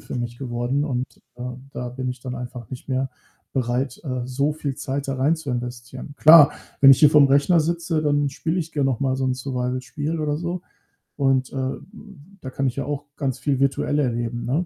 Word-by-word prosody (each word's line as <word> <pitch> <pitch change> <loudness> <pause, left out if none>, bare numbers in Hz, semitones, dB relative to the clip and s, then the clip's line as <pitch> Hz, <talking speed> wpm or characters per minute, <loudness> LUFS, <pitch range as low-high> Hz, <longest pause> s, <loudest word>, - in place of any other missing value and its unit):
für - - -8
mich 120 0 -4
geworden 125 +2 -1
und, 125 -3 -2 0.3
ähm, 125 +2 -7
da 125 0 -4
bin 130 +1 -4
ich 125 -1 -7
dann 125 -1 -5
einfach 125 -2 -8
nicht 130 +2 -8
mehr 130 0 -1 0.4
bereit, 125 0 -1
äh, 130 -3 -3
so 140 +4 0
viel 145 -3 -4
Zeit 140 0 -3
da 135 - -1
rein 140 +5 +3
zu 155 -4 -6
investieren. 125 +2 -6
Klar, 155 -2 +8 0.3
wenn 135 - +9
ich - - +3
hier 150 -1 +8
vor'm 145 -3 +6
Rechner 145 +6 +4
sitze, 165 0 -1
dann 145 -1 +2
spiele 160 +6 -2
ich 165 0 -5
gern 145 -3 +1
noch 130 -4 -1
mal 130 -1 +1
so 135 - -1
'n 130 - +1
Survival-Spiel 130 +4 -3
oder 150 -1 0
so. 175 +2 -3 0.6
Und, 135 -2 +1
äh, 130 -1 -1 0.7
da 130 - -6
kann 135 - -2
ich 130 - -3
ja 135 - -2
auch 145 0 -4
ganz 135 -3 -1
viel 140 -3 0
virtuell 140 +2 +1
erleben, 120 -2 -1
ne? 150 +8 0
135 Hz, 210 wpm, -23 LUFS, 125-145 Hz, 0.7 s, wenn